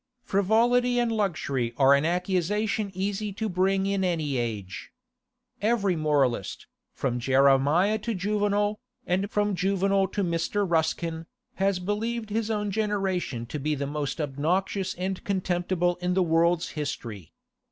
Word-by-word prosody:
Frivolity 235 +5 +2
and 240 -1 +2
luxury 140 - -1
are 135 0 +6
an 140 +2 +3
accusation 195 +5 0
easy 200 +2 -2
to 220 +3 -3
bring 190 +1 +1
against 195 -1 0
any 155 -6 -1
age. 105 -6 -4 0.7
Every 205 -4 +2
moralist, 145 - 0 0.3
from 125 -3 -1
Jeremiah 140 - +3
to 225 +1 -3
Juvenal, 205 +1 0 0.3
and 190 +3 0
from 210 -1 0
Juvenal 195 +1 +1
to 200 +2 -2
Mr. 180 +4 0
Ruskin, 165 0 -1 0.3
has 195 0 +2
believed 215 +4 -3
his 225 +1 -1
own 210 -2 -1
generation 195 - -1
to 145 +6 -5
be 150 +2 -1
the 140 0 -3
most 145 0 -3
obnoxious 170 +7 -1
and 185 +1 -3
contemptible 180 -2 0
in 180 0 -1
the 190 - +3
world's 170 +1 +2
history. 115 - -5
185 Hz, 135 wpm, -26 LUFS, 155-205 Hz, 0.7 s, are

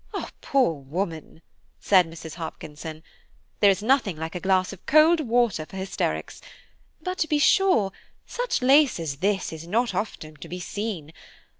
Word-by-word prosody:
"Poor 265 -10 +2
woman!" 160 +3 -5 0.4
said 185 -4 +4
Mrs. 160 -1 -9
Hopkinson, 160 -1 -8 0.6
"there 205 - +6
is 195 +1 +1
nothing 225 - +2
like 160 +1 -5
a 180 - -4
glass 190 +1 +1
of 190 - -13
cold 310 +3 +6
water 240 - +1
for 190 - -11
hysterics; 190 +1 -3 0.6
but 365 0 -4
to 315 - +1
be 300 - +2
sure, 290 - +4 0.3
such - - -2
lace 275 - +5
as 150 -4 -4
this 195 0 -1
is 160 +1 -8
not 230 +6 +1
often 155 -7 -4
to - - -10
be 180 - -5
seen. 185 -4 -5
190 Hz, 155 wpm, -25 LUFS, 165-245 Hz, 0.6 s, there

